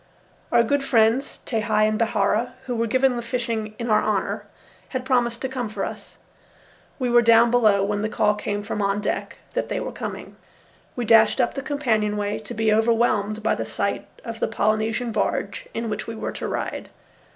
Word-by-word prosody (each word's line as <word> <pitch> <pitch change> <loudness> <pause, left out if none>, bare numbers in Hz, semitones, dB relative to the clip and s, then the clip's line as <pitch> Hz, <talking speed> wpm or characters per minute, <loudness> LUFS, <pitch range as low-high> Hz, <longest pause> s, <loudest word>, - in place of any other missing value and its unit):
Our 235 -1 +5
good 280 +4 +1
friends, 235 +1 +2
Tehei 215 -2 +1
and 215 0 -1
Bihaura, 220 +1 +1
who 250 -2 -3
were 230 0 0
giving 260 +2 +2
the - - -2
fishing 230 -3 -3
in 235 - -4
our 215 -2 +4
honour, 210 -3 -1 0.4
had 260 -1 -4
promised 245 -2 +1
to - - +1
come 255 -4 -4
for 215 - -3
us. - - -9 0.8
We 255 - -1
were 240 0 +6
down 230 0 +5
below 215 -5 +4
when 205 0 -1
the 215 - -1
call 210 -1 +2
came 205 0 -3
from 210 0 -3
on 200 0 +1
deck 210 - -3 0.2
that - - -2
they - - -1
were - - -4
coming. - - -7 0.6
We 245 - -2
dashed 225 +1 +5
up 245 - +2
the 275 - -4
companionway, 215 -8 0
to 215 - -8
be 220 0 +2
overwhelmed 220 -2 +2
by - - +2
the - - -2
sight - - -2 0.2
of 230 -1 -6
the - - +1
Polynesian 220 +2 0
barge 200 -2 -2
in 230 0 -3
which 215 -1 -4
we 225 - -5
were 220 - -4
to - - -5
ride. - - -4
225 Hz, 195 wpm, -23 LUFS, 215-240 Hz, 0.8 s, were